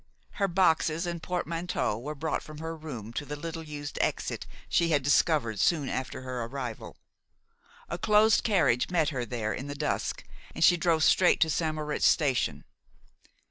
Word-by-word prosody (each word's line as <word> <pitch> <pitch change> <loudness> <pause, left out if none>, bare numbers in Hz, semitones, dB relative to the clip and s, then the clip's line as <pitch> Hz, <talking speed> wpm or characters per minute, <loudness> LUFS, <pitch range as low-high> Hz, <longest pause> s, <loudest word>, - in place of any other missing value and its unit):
Her 200 - +3
boxes 170 -2 +2
and 170 -1 -4
portmanteau 175 -8 -2
were 145 +7 -6
brought 160 +2 -2
from 155 -1 -11
her 160 +1 -5
room 130 -9 -7
by 130 - -4
the 145 +1 -6
little 165 +2 -6
used 150 -2 -7
exit - - -2 0.2
she 170 -1 +2
had 145 -4 +2
discovered 140 - +2
soon 165 -6 +2
after 130 0 -4
her 130 -2 -4
arrival. 125 -2 -6 0.9
A 170 - -5
closed 215 0 +4
carriage 170 - +2
met 165 -4 +2
her 125 -4 -3
there 110 -2 -3
in 135 - -5
the 145 - -5
dusk, 150 +1 -2 0.3
and - - 0
she 175 - +7
drove 165 -2 +2
straight 180 +2 +4
to 160 - +4
St. 155 -1 0
Moritz 150 -1 0
station. 135 -5 +1
155 Hz, 170 wpm, -28 LUFS, 135-170 Hz, 0.9 s, she